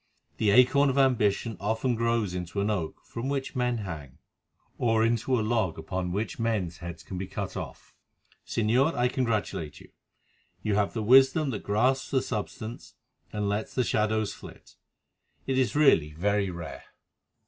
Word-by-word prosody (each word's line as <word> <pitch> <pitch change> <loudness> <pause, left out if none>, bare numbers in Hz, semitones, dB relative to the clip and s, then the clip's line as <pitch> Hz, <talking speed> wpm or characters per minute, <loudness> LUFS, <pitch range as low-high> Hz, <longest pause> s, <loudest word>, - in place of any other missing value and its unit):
The 110 - +2
acorn 130 +6 +5
of 135 - -1
ambition 115 -5 +2
often 110 +5 0
grows 115 -4 0
into 90 +2 -4
an 100 +2 +1
oak 90 -7 -4
from 120 +4 -5
which 140 0 -3
men 125 -1 +1
hang." 75 - -7 0.6
"Or 115 -2 +3
into 120 +2 +1
a 110 - -1
log 110 -7 0
upon 90 -2 -3
which 105 +6 -3
men's 105 -7 -1
heads 85 -1 -7
can 95 - -6
be 95 - -4
cut - - -5
off. - - -8 0.5
Señor, 125 +8 +1
I 120 0 +2
congratulate 110 - -2
you. - - -16 0.7
You 105 - 0
have 100 0 +1
the 110 - -1
wisdom 135 +5 +5
that 105 - -4
grasps 125 +6 +1
the 130 -2 +1
substance 110 0 -5 0.4
and 105 -1 -2
lets 105 +2 -2
the 125 - +2
shadows 110 -2 0
flit. - - -13 0.7
It 130 -1 +1
is 130 +1 +1
really 85 - +4
very 100 +4 0
rare." 85 -1 -7
110 Hz, 160 wpm, -28 LUFS, 100-125 Hz, 0.7 s, acorn